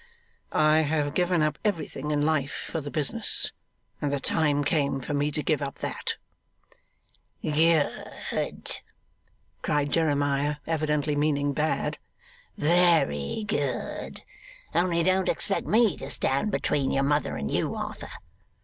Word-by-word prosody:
'I 155 0 +4
have 150 -1 0
given 180 -1 +2
up 155 -1 0
everything 155 -7 -2
in 145 -1 +1
life 150 -3 0
for 160 - -2
the 145 - -6
business, 155 +10 +2 0.5
and 145 -2 0
the 140 - 0
time 145 0 +1
came 140 -2 +1
for 135 - -4
me 145 +1 +1
to 150 0 -2
give 155 -3 +1
up 140 -1 -3
that.' - - -3 1.3
'Good!' 160 0 0 0.8
cried 145 -1 0
Jeremiah, 145 -2 +1
evidently 150 -2 0
meaning 145 -1 +1
Bad. 155 +2 -1 0.6
'Very 165 - +3
good! 140 - -3 0.5
only 170 -1 +2
don't 185 +1 +2
expect 195 - -1
me 220 -1 +4
to 135 - -7
stand 140 +11 0
between 145 -8 0
your 135 - +1
mother 145 +2 +1
and 70 0 -3
you, - - 0
Arthur. - - -5
150 Hz, 130 wpm, -27 LUFS, 145-165 Hz, 1.3 s, I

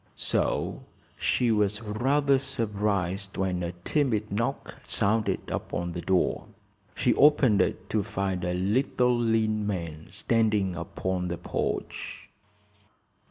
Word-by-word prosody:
So - - 0 0.4
she 120 -2 +2
was 105 -1 +1
rather 135 +6 +2
surprised 105 -7 -1
when 95 -2 0
a 85 0 -3
timid 115 -7 0
knock 115 +4 -2
sounded 110 +2 0
upon 85 0 -3
the 85 0 -5
door. 95 0 +1 0.5
She - - +2
opened 135 -9 +5
it - - -1
to 110 - +2
find 95 -2 -2
a 90 0 -1
little, 125 +6 +2
lean 110 -2 +1
man 85 -6 -4
standing 105 -5 +1
upon 90 +2 -3
the 85 0 -3
porch. 85 - -4
105 Hz, 115 wpm, -27 LUFS, 90-115 Hz, 0.5 s, opened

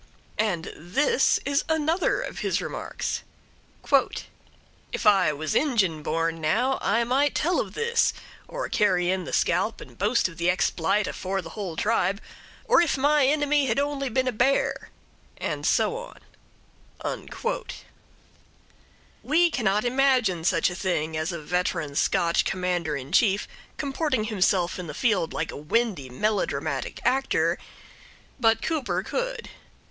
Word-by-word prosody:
And 190 -7 0
this 270 - +2
is 285 +1 +1
another 320 +8 +1
of - - -6
his - - 0
remarks: - - -4 1.7
"'If - - -4
I 195 -6 +5
was 150 0 -3
Injin 205 - +1
born, 165 +1 -1
now, 245 +13 +1
I 225 +5 +2
might 270 +5 +1
tell 345 +4 +1
of - - -4
this, 465 +1 +2 0.4
or - - -4
carry 180 -3 +2
in 190 -1 -2
the - - -6
scalp - - +1
and - - -12
boast 215 +2 +2
of 180 - -12
the 170 - 0
expl'ite 185 +2 +1
afore 195 +1 -3
the 165 - -9
whole 190 -5 -5
tribe; 200 0 +1 0.5
or 475 - +5
if 330 -5 +1
my 290 +1 +3
inimy 290 -1 +2
had 230 - 0
only 280 -1 -1
been 255 +2 0
a - - +2
bear'" 245 +5 +1 0.5
and - - -3
so 460 - +2 1.0
on. - - -5 1.9
We 335 +4 +3
cannot 215 -4 +1
imagine 245 -9 +2
such 180 - +2
a - - -6
thing 160 -4 -1
as 155 +3 -1
a 170 - -5
veteran 165 -2 -2
Scotch 170 +3 +2
Commander 180 -5 -1
in 135 +1 -8
Chief 200 +1 +3 0.3
comporting 275 -4 -1
himself 190 -4 +1
in 180 - -6
the - - -7
field 205 -9 +1
like - - -3
a - - -8
windy 165 - -1
melodramatic 210 +12 -2
actor, 270 +1 +1 0.8
but 225 -2 +3
Cooper 315 -5 -1
could. - - -4
210 Hz, 140 wpm, -25 LUFS, 175-275 Hz, 1.9 s, I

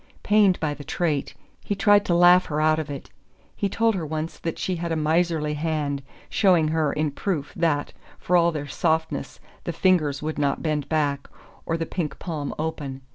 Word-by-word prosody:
Pained 205 -3 +4
by 150 -2 -1
the 145 - -9
trait, 150 -3 -1 0.3
he 205 - -2
tried 205 0 +4
to 175 - +2
laugh 175 +1 +6
her 150 0 -2
out 155 0 +3
of 155 -2 -4
it. 140 -2 -7 0.4
He 200 - -1
told 230 +3 +2
her 185 -4 -3
once 155 +1 -4
that 165 - -4
she 185 -2 -2
had 170 0 -3
a - - +1
miserly 160 -1 +1
hand 150 -2 -2 0.3
showing 175 -6 +3
her, 155 -2 +1
in 150 -1 -1
proof, 150 -1 -3
that, 160 -4 0 0.2
for 180 - 0
all 170 -1 +4
their 145 -3 -4
softness, 160 +2 -1 0.2
the - - -3
fingers 155 -7 +2
would 155 0 -3
not 140 -1 0
bend 150 -3 -1
back, 145 -3 0 0.4
or 165 - 0
the 165 - -2
pink 160 -3 -4
palm 155 -5 -4
open. 145 -4 -4
160 Hz, 190 wpm, -24 LUFS, 150-175 Hz, 0.4 s, laugh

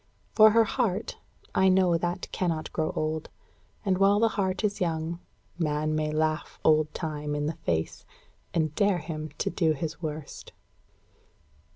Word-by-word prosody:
For 215 0 +8
her 225 +1 +5
heart, 220 -3 -1 0.4
I 190 0 +4
know 185 -2 +4
that 175 +2 -2
cannot 165 -4 -2
grow 155 -1 0
old; 155 0 -2 0.6
and 190 -2 +1
while 200 +1 +5
the 225 0 +4
heart 190 -1 -1
is 205 -2 -1
young, 165 0 -1 0.4
man 155 -1 0
may 155 0 0
laugh 155 +1 -1
old 155 -1 +4
Time 150 -3 -3
in 145 0 -1
the 155 - -1
face, 85 - -2 0.5
and 155 -3 0
dare 200 +2 +2
him 155 -1 -5
to - - -1
do 165 -2 +2
his 160 +3 -5
worst. 155 -2 -6
160 Hz, 155 wpm, -27 LUFS, 155-190 Hz, 0.6 s, For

